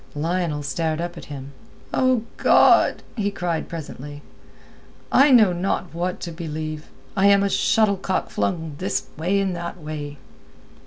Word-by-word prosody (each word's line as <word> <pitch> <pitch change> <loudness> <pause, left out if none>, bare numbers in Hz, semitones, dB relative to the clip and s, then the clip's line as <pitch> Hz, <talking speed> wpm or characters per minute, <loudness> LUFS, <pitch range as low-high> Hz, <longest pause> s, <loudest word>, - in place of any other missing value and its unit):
Lionel 165 -1 -1
stared 155 +3 -1
up 175 +1 -4
at 165 - -9
him. 140 -1 -8 0.4
"O 255 -3 +2
God!" - - +5
he 205 -4 0
cried 175 -4 -3
presently, 145 -3 -8 0.9
"I 280 +2 +6
know 220 -8 +6
not 180 0 -2
what 180 +2 -2
to 170 - -5
believe. 155 -2 -5 0.3
I 195 0 +4
am 200 0 +5
a 200 - +1
shuttle 215 -3 +3
cock 190 0 -2
flung 165 -4 -2
this 190 - -1
way 180 +6 0
and 190 -2 -1
that 170 +1 -6
way." 150 -2 -6
170 Hz, 150 wpm, -23 LUFS, 155-195 Hz, 0.9 s, I